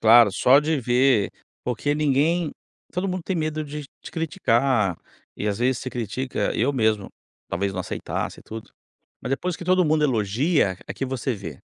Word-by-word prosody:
Claro, 115 -2 +7
só 125 +6 +6
de 150 0 +1
ver 125 -2 +3 0.3
porque 135 +4 0
ninguém 155 +3 +2 0.4
todo 180 +2 -1
mundo 185 -1 -2
tem 190 - -1
medo 155 -1 -1
de 150 0 -6 0.2
te - - -8
criticar? 125 - +1 0.4
E 105 - -3
às 100 -1 0
vezes 125 +1 +2
você 130 - -5
critica 120 -1 -2
eu 125 +6 +2
mesmo 110 -6 +1 0.4
talvez 100 +2 -1
não 95 - -3
aceitasse - - -4
e - - -16
tudo. 110 0 -9 0.5
Mas 125 - -5
depois 175 +6 -1
que - - -8
todo 185 0 +4
mundo 155 -1 +2
elogia, 115 - +2
é - - -5
que - - -2
você 130 -1 -2
vê. 85 -9 -8
130 Hz, 180 wpm, -24 LUFS, 110-150 Hz, 0.5 s, Claro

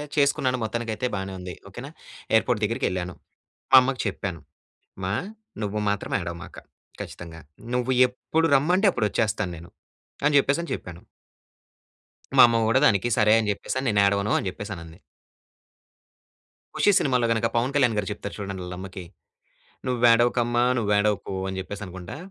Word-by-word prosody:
చేసుకున్నాను 140 -3 +2
మొత్తానికైతే 115 +1 -2
బానే 95 0 -4
ఉంది. 90 0 -7 0.2
ఓకేనా! 120 +9 -9 0.4
ఎయిర్‌పోర్ట్ 110 0 +2
దగ్గరికెళ్ళాను. 95 -5 -1 0.6
మా 135 - +10
అమ్మకి 130 0 -1
చెప్పాను, 95 -4 -4 0.6
అమ్మా! 95 0 -3 0.5
నువ్వు 105 +1 -2
మాత్రం 100 -1 -3
ఏడవమాక 85 -1 -7 0.4
ఖచ్చితంగా. 85 -1 -9 0.3
నువ్వు 125 +1 0 0.2
ఎప్పుడు 160 +6 -1
రమ్మంటే 180 +9 +3
అప్పుడొచ్చేస్తాను 105 - -1
నేను 85 +2 -12 0.6
అని 150 0 +3
చెప్పేసని 140 +5 +1
చెప్పాను. - - -7 1.4
మా - - +10
అమ్మ 115 -1 +1
కూడా 130 +3 +4
దానికి 105 -1 +3
సరే! 105 -1 +5
అని 110 -2 -1
చెప్పేసి 100 - -4
అని, 130 - -3
"నేను 100 -2 +3
ఏడవను" 100 +1 +1
అని - - -4
చెప్పేసి 105 +3 -8
అని 85 - -9
అంది. 80 +1 -14 1.8
'ఖుషి' 205 - +4
సినిమాలో 125 -3 +2
గనుక 115 0 +1
పవన్ 120 +3 +1
కళ్యాణ్ 130 -5 +3
గారు 105 -2 -1
చెప్తారు 100 0 -6
చూడండి 100 -2 -5
వాళ్ళమ్మకి, 90 +1 -7 0.8
నువ్వేడవకమ్మా! 120 0 +3
నువ్వేడవకు 105 -2 +1
అని 95 0 -4
చెప్పేసి 100 +2 -7
అనుకుంటా. 95 +5 -8
105 Hz, 135 wpm, -25 LUFS, 95-125 Hz, 1.8 s, మా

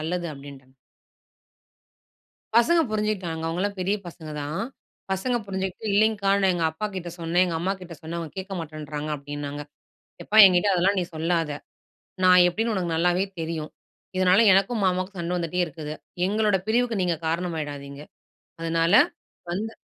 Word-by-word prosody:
நல்லது" 175 +3 -2
அப்டின்ட்டேன். 135 -2 -13 1.8
பசங்க 330 +9 +5
புரிஞ்சுகிட்டாங்க. 205 -7 -2
அவங்கலாம் 200 +5 -2
பெரிய 195 +3 +1
பசங்க 160 -2 -9
தான். 150 +3 -3 0.5
பசங்க 240 +6 0
புரிஞ்சுகிட்டு 190 +1 -4
இல்லிங்க்கா. 205 -1 +3
"நான் 190 -1 +4
எங்க 170 -2 -1
அப்பா 160 +7 -4
கிட்ட 180 -2 -5
சொன்னன், 170 +2 +2
எங்க 170 -3 -2
அம்மாகிட்ட 180 -1 -3
சொன்னன். 170 +1 -5
அவங்க 165 -3 -6
கேட்க 190 +1 -6
மாட்டன்றாங்க" 155 -1 -6
அப்டின்னாங்க. 145 0 -6 0.6
எப்பா 215 - -2
எங்கிட்ட 185 +2 +3
அதெல்லாம் 190 +3 +2
நீ - - -1
சொல்லாத. 165 0 0 0.7
நான் 180 -1 +7
எப்படின்னு 225 +5 -1
உனக்கு 175 -4 -1
நல்லாவே 175 +3 +2 0.2
தெரியும். 160 -1 -4 0.5
இதனால 185 +1 +5
எனக்கும், 200 +4 +2
மாமாவுக்கும் 185 +1 -1
சண்ட 170 +1 -2
வந்துட்டே 170 +1 -2
இருக்குது. 155 -2 -7 0.3
எங்களோட 210 0 +2
பிரிவுக்கு 230 -2 +1
நீங்க 175 -2 +1
காரணமாய்டாதீங்க. 150 -5 -4 0.6
அதனால 165 +1 +1 0.6
வந்து 215 +5 -3
175 Hz, 135 wpm, -25 LUFS, 160-195 Hz, 1.8 s, நான்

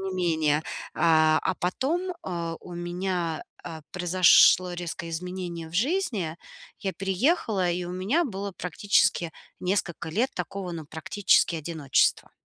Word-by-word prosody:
не 190 -1 -4
менее. 160 -4 +1 0.3
А, 155 -1 +4
а 185 - 0
потом, 315 - -1
э, 170 -2 -3
у 175 - -10
меня, 175 -1 -2 0.2
а, 160 -2 -7
произошло 180 0 +5
резкое 170 -1 -5
изменение 175 -1 -5
в 160 - -14
жизни. 220 - 0 0.4
Я 195 - -3
переехала, 195 - +1
и 175 +1 -2
у 175 - -6
меня 205 - +1
было 200 -6 -4
практически 175 -1 +1 0.3
несколько 180 -3 -1
лет 240 +9 +1
такого, 180 +2 -4
ну, 160 -3 -6
практически 165 +3 +2
одиночества. 155 -3 +1
180 Hz, 130 wpm, -26 LUFS, 165-195 Hz, 0.4 s, произошло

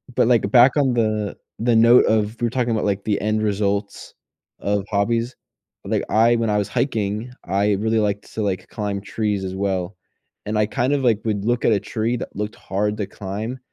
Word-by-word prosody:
But, - - +3
like, 115 -5 +3
back 125 +4 +6
on 135 -3 +3
the 110 -3 -1 0.2
the 120 0 +2
note 115 +2 +6
of 110 +1 +1
we're 120 - +1
talking 120 -1 -1
about, 110 -2 0
like, 100 -1 -1
the 105 -2 0
end 110 +1 0
results 100 -1 -2 0.5
of 100 -1 -1
hobbies. 115 +4 0 0.5
Like, - - 0
I 115 +2 +4
when 115 -1 0
I 105 - +2
was 105 -1 0
hiking, 115 -2 -2
I 100 +2 +1
really 110 +3 +1
liked 105 -1 -2
to, 110 - -3
like, 95 -3 -2
climb 100 -2 -3
trees 105 -1 -2
as 95 0 -4
well, 95 -1 -2 0.5
and 105 +1 -2
I 105 - +3
kind 125 +6 0
of, 140 -2 0
like, 115 -4 +3
would 105 -2 -1
look 120 0 0
at - - +4
a 100 - +2
tree 115 +4 -2
that - - -7
looked 105 +1 -4
hard 105 +2 -2
to 105 -3 -3
climb, 105 +6 -5
105 Hz, 205 wpm, -21 LUFS, 100-115 Hz, 0.5 s, back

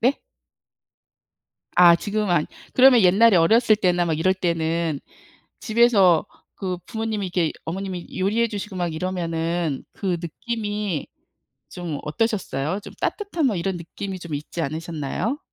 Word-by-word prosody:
네? 255 +4 +2 1.6
아 175 -1 +9
지금 210 +3 -2
안 165 -3 +2 0.3
그러면 255 -2 +7
옛날에 195 +3 +6
어렸을 220 +6 +5
때나 180 -4 +1
막 160 -2 0
이럴 185 +3 +3
때는 165 -3 -1 0.6
집에서 215 -8 +4 0.3
그 185 -3 -4
부모님이 220 -3 -3
이렇게 175 -3 0
어머님이 185 +1 -5
요리해 220 +5 +1
주시고 205 -1 -6
막 175 -3 -2
이러면은 165 -3 -2
그 185 -3 -2
느낌이 205 - -3 0.6
좀 165 -5 -5
어떠셨어요? 185 - -1
좀 - - -10
따뜻한 400 -7 -1
뭐 225 -7 +2
이런 180 +1 -2
느낌이 190 +3 -6
좀 170 -3 -8
있지 150 +4 -5
않으셨나요? 160 - -3
185 Hz, 290 characters per minute, -23 LUFS, 165-215 Hz, 1.6 s, 아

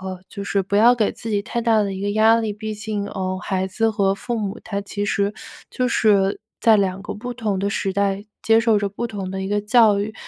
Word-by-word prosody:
呃， 185 -1 -6
就 200 - -6
是 200 0 0
不 200 +2 -1
要 235 +3 +6
给 220 -4 0
自 225 - -8
己 205 -2 0
太 235 - -3
大 225 -2 +3
的 200 -1 -2
一 190 - -6
个 205 +1 -1
压 220 +1 +5
力， 215 -2 -2
毕 215 0 -5
竟， 210 -1 -4
嗯， 185 0 -3
孩 190 0 -2
子 225 +4 0
和 195 -2 +1
父 235 +3 -4
母 205 +1 -3
他 200 -1 -3
其 205 0 -4
实 200 +1 0 0.3
就 255 - -1
是 205 -4 +2 0.2
在 220 -2 +5
2 195 0 -1
个 - - -5
不 245 +3 -6
同 215 -5 -2
的 200 +1 0
时 195 -1 -1
代 200 0 0 0.2
接 225 0 +4
受 225 -2 +3
着 205 - -1
不 205 +4 -4
同 195 -4 -5
的 190 0 -4
一 190 - -3
个 205 0 0
教 215 -2 +4
育。 215 +2 -4
205 Hz, 265 characters per minute, -21 LUFS, 195-220 Hz, 0.3 s, 要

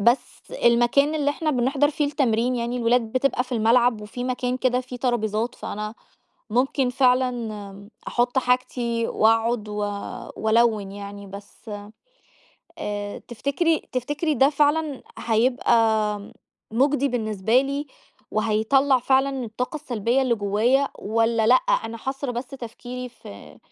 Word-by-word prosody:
بس 235 +5 +1 0.2
المكان 240 +5 +4
اللي 290 -2 +1
إحنا 310 +2 -1
بنِحضَر 270 +2 +2
فيه 305 0 -1
التمرين، 250 -4 +1
يعني 235 +1 -2
الولاد 235 -1 +1
بتبقى 255 -1 +1
في 250 - -10
الملعب 235 0 +3
وفي 210 +4 -6
مكان 250 0 -1
كده 250 -1 +1
فيه 250 0 -8
ترابيزات، 235 -2 -1
فأنا 210 +1 -5 0.6
ممكن 255 +3 +1
فعلًا 235 -6 0 0.2
أحُط 245 +2 0
حاجتي 245 -2 0
وأقعد 225 0 +2
و 210 - -5 0.6
وألوِّن 220 -3 +2
يعني، 200 0 -8
بس 200 +4 -12 1.1
آآ 205 0 -4
تِفتكري 280 +7 0
تِفتكري 290 +5 -1
ده 270 +1 +5
فعلًا 295 -1 +1 0.2
هيبقى 235 +2 +2 1.0
مُجدي 280 +3 +2
بالنسبة 220 -1 +1
لي 280 +2 -3 0.4
وهيطلَّع 225 +6 +2
فعلًا 265 +1 +1
الطاقة 245 +6 -4
السلبية 250 -3 0
اللي 250 -3 +2
جوّايا 225 +7 +2
والّا 225 +1 +1
لأ، 245 - +7
أنا - - +1
حاصرة 265 +2 -4
بس 245 +1 -4
تفكيري 250 0 -7
في 100 - -13
245 Hz, 125 wpm, -24 LUFS, 220-270 Hz, 1.1 s, لأ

